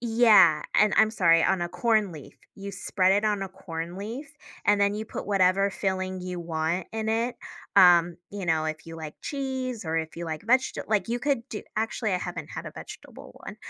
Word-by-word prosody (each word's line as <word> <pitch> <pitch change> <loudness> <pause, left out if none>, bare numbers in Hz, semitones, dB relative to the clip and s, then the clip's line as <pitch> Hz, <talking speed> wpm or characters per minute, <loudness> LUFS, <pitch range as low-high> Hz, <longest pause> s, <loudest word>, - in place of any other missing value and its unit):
Yeah, 220 -9 +5
and 215 - +4
I'm 220 0 +5
sorry, 165 -6 +4
on 190 -2 +2
a 175 - -2
corn 215 -2 +1
leaf. 150 -3 -11 0.2
You 200 0 -7
spread 185 0 +1
it 205 +2 +2
on 205 -2 0
a 195 - -4
corn 170 -1 -7
leaf 240 +9 -7 0.3
and 205 0 +3
then 200 0 +2
you 215 +1 -4
put - - -7
whatever 195 0 +3
filling 185 -1 -2
you 180 -1 -5
want 165 +2 -2
in 220 0 -3
it. 230 +2 0 0.4
Um, 175 -2 +6
you 200 -2 -6
know, 160 -1 +1
if 155 0 -4
you 165 - -8
like 155 -2 -7
cheese, 260 -6 -4
or 160 0 -2
if 160 0 -3
you 170 - -5
like 160 +4 -5
vegeta 255 +3 +1
like, 215 +1 +1
you 240 - -1
could 275 -4 -1
do 210 - -6
actually, 220 -1 -1
I 180 - +1
haven't - - -6
had - - -7
a - - -7
vegetable - - -11
one. - - -8
195 Hz, 210 wpm, -26 LUFS, 170-220 Hz, 0.4 s, Um